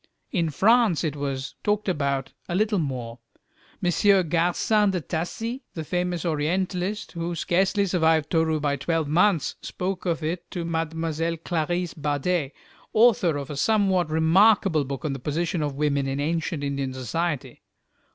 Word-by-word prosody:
In 170 -6 +1
France 215 - +3
it 150 -3 -1
was 135 -2 -4
talked 210 0 0
about 140 -6 -1 0.2
a 175 - -1
little 210 0 +2
more. 125 -6 -4 0.6
M. 185 0 +3
Garcin 180 +5 +2
de 190 -2 0
Tassy, 205 - -4
the 160 - -4
famous 180 +1 -2
Orientalist, 180 +5 -1
who 170 0 -3
scarcely 190 +5 +1
survived 160 -4 +2
Toru 160 -2 +2
by 145 -1 0
twelve 160 +2 -1
months, 170 +1 +2
spoke 185 0 -4
of 165 -2 -1
it 170 +3 -3
to 175 -2 -4
Mlle. 165 -1 -1 0.5
Clarisse 175 +1 -2
Bader, 150 +1 -1 0.4
author 215 -9 +4
of 140 0 -5
a - - -4
somewhat 190 0 +2
remarkable 160 0 +4
book 140 +3 -5
on 145 - -1
the 135 - -5
position 165 +5 -1
of 145 -2 -2
women 140 -1 0
in 135 +1 -2
ancient 160 0 -1
Indian 140 -2 -2
society. 140 0 -3
165 Hz, 150 wpm, -25 LUFS, 145-185 Hz, 0.6 s, author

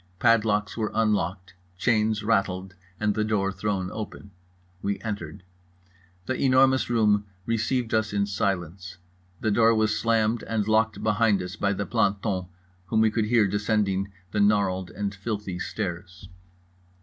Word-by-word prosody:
Padlocks 105 -2 +2
were 110 -2 -1
unlocked, 105 -4 0 0.2
chains 110 +1 +1
rattled, 95 -4 0 0.3
and 105 -1 +1
the 110 - 0
door 105 -3 0
thrown 95 -1 -2
open. 105 -2 -7 0.5
We 100 0 -2
entered. 100 -4 -5 0.8
The 130 - -1
Enormous 130 -1 +4
Room 105 -3 +2 0.2
received 115 +1 -1
us 110 -1 +1
in 100 -1 +1
silence. 90 -2 -3 0.4
The 110 - +1
door 115 +2 +4
was 110 -1 +2
slammed 115 0 +1
and 110 -2 -2
locked 110 0 +1
behind 105 -2 +2
us 90 +2 -6
by 100 -1 0
the 100 +1 -3
planton, 100 -4 0 0.4
whom 110 +1 +2
we 110 -1 +4
could 110 -1 0
hear 110 -1 +4
descending 100 -1 0 0.2
the 105 - -1
gnarled 100 -3 +2
and 100 +2 -4
filthy 100 -2 -4
stairs. 90 -2 -5
105 Hz, 140 wpm, -26 LUFS, 95-110 Hz, 0.8 s, Enormous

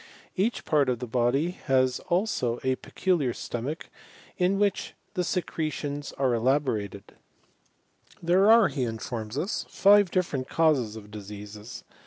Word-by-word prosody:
Each 210 +6 0
part 145 -4 +3
of 125 - +1
the 125 - -5
body 125 +7 +1 0.2
has 130 -2 +2
abo 175 - 0
a 130 0 +2
pecu 180 +3 -1
Har 125 -3 0
stomach 130 +9 -5 0.5
in 185 +2 +2
which 205 -1 0 0.2
the 180 -3 0
secretions 155 -5 -3
are 130 -3 +1
elaborate. 115 -5 0 1.1
There 185 +5 +4
are, 225 -2 +7
he 140 - -3
informs 115 0 -4
us, 180 +7 -2
five 205 -1 +5
different 150 -9 -1
causes 140 -10 +2
of 105 -1 -11
diseases. 105 +1 -9
135 Hz, 135 wpm, -27 LUFS, 120-175 Hz, 1.1 s, are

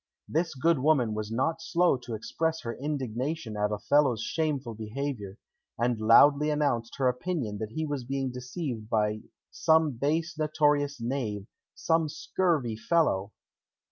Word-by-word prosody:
This 160 0 -1
good 160 +3 +2
woman 130 -6 +2
was 105 0 -4
not 160 +8 0
slow 175 0 +2
to 120 -2 -6
express 160 +9 -2
her 115 - -4
indignation 135 -2 -3
at 105 0 0
Othello's 125 +1 +2
shameful 145 -7 -2
behaviour, 110 -2 -5 0.4
and 120 -1 0
loudly 140 +7 +6
announced 140 -6 0
her 135 - +2
opinion 125 - -2
that 110 0 -5
he 160 +3 -2
was 145 -4 -3
being 135 +1 -2
deceived 125 -3 -5
by 105 -1 +1 0.3
"some 160 -2 +3
base 155 +6 -1
notorious 150 -2 +1
knave, 115 -5 -3 0.3
some 165 -1 +1
scurvy 155 -6 0
fellow!" 110 - +1
135 Hz, 140 wpm, -28 LUFS, 115-155 Hz, 0.4 s, loudly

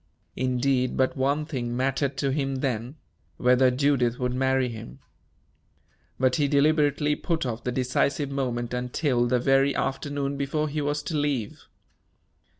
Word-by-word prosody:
Indeed, 130 0 0
but 130 0 +1
one 140 +3 0
thing 120 -6 -3
mattered 135 +1 0
to 140 - 0
him 135 -1 -1
then 130 -1 -2 0.4
whether 125 +1 +4
Judith 125 -2 +1
would 125 -1 -1
marry 130 0 +1
him. 115 -1 -8 1.2
But 130 0 +2
he 145 -2 +2
deliberately 145 0 +2
put 165 -3 -2
off 120 -1 -4
the 125 - -1
decisive 135 +3 0
moment 125 -3 -2
until 125 0 0
the 125 +1 +2
very 135 +2 +3
afternoon 140 0 -2
before 150 +2 -1
he 150 +1 -2
was 145 +1 -1
to 160 - -4
leave. 145 -7 -2
135 Hz, 145 wpm, -26 LUFS, 125-145 Hz, 1.2 s, whether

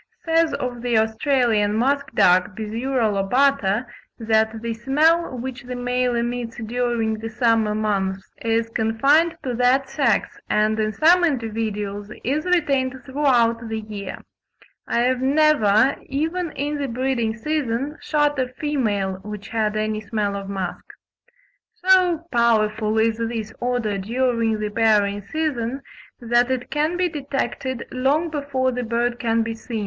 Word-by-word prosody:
says 330 0 +3
of 245 -1 -4
the 240 -2 +1
Australian 220 -2 +2
musk 280 +4 +1
duck 180 +2 +4
(Biziura 230 +3 -1
lobata) 225 +2 +2 0.3
that 220 0 +1
"the 230 -1 -2
smell 295 +5 +2
which 255 +2 -6
the 250 -1 -7
male 245 0 0
emits 235 0 -3
during 230 -2 -1
the 225 +1 -5
summer 225 -2 +1
months 195 -3 -2
is 230 0 0
confined 280 +10 +2
to 255 - -2
that 250 +3 +2
sex, - - 0
and 215 +1 +2
in 215 0 +1
some 340 +9 +4
individuals 215 -7 -2
is 295 +6 -1
retained 280 -7 +1
throughout 240 -5 +1
the 220 0 -2
year; 210 -2 -7 0.7
I 235 - +1
have 255 +1 +1
never, 270 -5 +4
even 325 +5 -2
in 290 +2 -3
the 280 - -1
breeding 235 -2 -1
season, 285 +1 -2
shot 295 -2 +1
a 255 - +1
female 220 -9 -2
which 210 0 -8
had 215 -2 0
any 215 0 -1
smell 205 -1 -2
of 200 0 -6
musk." 190 -3 -4 0.9
So 365 -3 +3
powerful 220 -2 +2
is 220 0 +2
this 225 -1 -3
odour 240 -5 -1
during 230 +1 0
the 210 0 -3
pairing 205 -2 +2
season, 275 -4 -2 0.4
that 240 +1 +2
it 255 -1 -3
can 310 +4 0
be 365 0 +2
detected 270 -4 -3
long 285 +6 +1
before 280 -3 -1
the 250 0 -3
bird 240 +1 -1
can 230 -1 +1
be 225 0 -3
seen. 225 0 -6
240 Hz, 145 wpm, -22 LUFS, 220-275 Hz, 0.9 s, duck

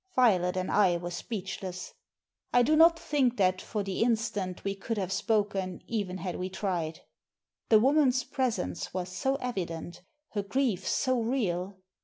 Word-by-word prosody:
Violet 185 -7 +3
and 185 0 -1
I 185 -4 +4
were 175 +1 -5
speechless. 185 -2 -5 0.6
I 245 - +5
do 305 +6 +3
not 330 +1 +7
think 270 -6 +1
that, 185 -2 +2
for 210 -2 -3
the 195 -1 -3
instant, 220 -5 0
we 195 - -1
could 215 +3 -4
have 190 -2 -2
spoken 200 -3 0
even 200 -5 -2
had 180 -1 -4
we 185 +1 -3
tried. 180 -5 -3 0.7
The 220 - +7
woman's 265 0 +3
presence 225 - -2
was 180 -1 -2
so 265 +9 0
evident, 175 - -4 0.3
her 205 - -2
grief 205 -2 -1
so 255 -3 +1
real. 200 -6 -1
200 Hz, 155 wpm, -29 LUFS, 185-245 Hz, 0.7 s, not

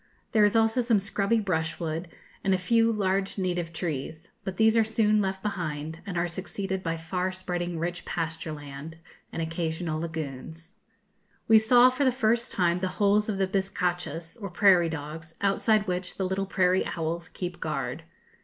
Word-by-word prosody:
There 215 -2 +4
is 205 +1 +4
also 225 +2 +3
some 230 -3 +3
scrubby 200 +3 +1
brushwood, 165 -3 -2 0.4
and 190 -1 +3
a - - +1
few 225 +5 +3
large 195 -2 0
native 175 -3 -1
trees; 160 -1 -4
but 190 -1 -5
these 220 0 +5
are 225 - +5
soon 215 -1 +2
left 190 -1 -2
behind, 160 -6 -3
and 180 -3 -3
are 170 +1 +1
succeeded 190 +2 -4
by 165 -2 -2
far 180 +3 -2
spreading 175 -2 -3
rich 175 +2 -3
pasture 165 -1 -3
land, 145 +1 -8 0.3
and 165 - -2
occasional 160 -1 -2
lagunes. 160 +2 -6 0.7
We 220 0 +8
saw 245 +3 +6
for 255 +3 0
the 260 - +4
first 235 -1 +1
time 175 -1 +2
the 185 - 0
holes 210 +1 +3
of 205 - -1
the 190 - +2
bizcachas, 175 -2 -2
or 200 - -4
prairie 180 -2 +5
dogs, 160 +1 -7
outside 210 +2 +2
which 180 -1 -2
the 190 - 0
little 190 +1 -1
prairie 185 -1 +3
owls 165 +1 -3
keep 175 -1 -5
guard. 135 -3 -3
180 Hz, 170 wpm, -27 LUFS, 165-200 Hz, 0.7 s, We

